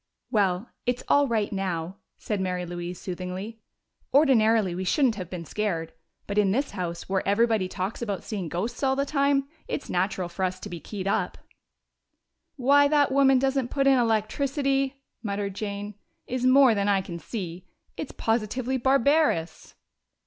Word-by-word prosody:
"Well, 195 0 +1 0.2
it's 245 0 0
all 285 0 +4
right 220 -4 0
now," 185 -2 -3 0.2
said 210 -3 -3
Mary 180 -1 -2
Louise 175 0 -6
soothingly. 185 +4 -6 0.5
"Ordinarily 225 - +4
we 185 +2 -3
shouldn't 255 - +3
have 185 -5 -7
been 175 -2 -6
scared. 165 -5 -2 0.3
But 200 +1 0
in 200 -2 +3
this 275 +7 0
house, 170 -2 -4
where 190 0 +1
everybody 220 -1 +2
talks 190 +4 -4
about 205 -5 -3
seeing 195 -6 -4
ghosts 185 +9 -3
all 265 -1 +2
the 275 +1 0
time, 280 -1 +1 0.2
it's - - -4
natural 185 0 0
for 175 +2 -5
us 185 0 -1
to - - -7
be 175 - -6
keyed 195 +2 -6
up." 200 - 0 1.2
"Why 285 +1 +5
that 290 -2 +3
woman 270 -1 +5
doesn't 270 -1 +1
put 275 0 0
in 270 -2 +5
electricity," 270 +4 0 0.2
muttered 200 -2 -3
Jane, 205 0 -5 0.3
"is 255 0 -1
more 260 -2 +7
than 200 -1 0
I 195 -1 +3
can 175 -3 -7
see. 180 -1 -6 0.3
It's 305 - -5
positively 240 +3 -1
barbarous!" 265 - +1
215 Hz, 160 wpm, -26 LUFS, 185-265 Hz, 1.2 s, more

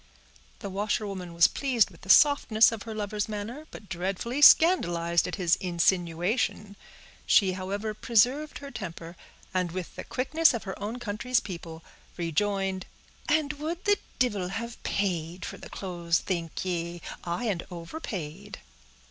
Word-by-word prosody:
The 200 - -5
washerwoman 200 -2 -2
was 170 0 +6
pleased 255 -6 +1
with - - -17
the - - -13
softness 250 -7 +6
of 225 -2 -5
her 220 - -5
lover's 210 0 -2
manner, 225 +9 -6
but 210 - -11
dreadfully 195 +10 -3
scandalized 170 - +5
at 180 - -3
his 175 -4 +2
insinuation. 180 +4 0 0.5
She, 195 -3 +5
however, 200 +4 -3
preserved 250 +7 +2
her 280 -1 -9
temper, 170 -5 -7 0.4
and 180 -2 0
with 180 0 -6
the - - -6
quickness 290 +3 +2
of 230 - -4
her 190 - -5
own 215 +4 -3
country's 240 +2 0
people, 165 -4 -8 0.3
rejoined, 190 +2 -1 0.4
"And 300 -1 +2
would 335 +4 -4
the 410 0 +3 0.2
divil 205 -8 +1
have 225 +5 -5
paid 180 -3 -2
for - - -7
the - - -10
clothes, 170 -3 -1
think 170 -1 -3
ye?—aye, 175 +3 -4
and 190 -5 -1
overpaid." 180 - -6
200 Hz, 140 wpm, -28 LUFS, 175-235 Hz, 0.5 s, was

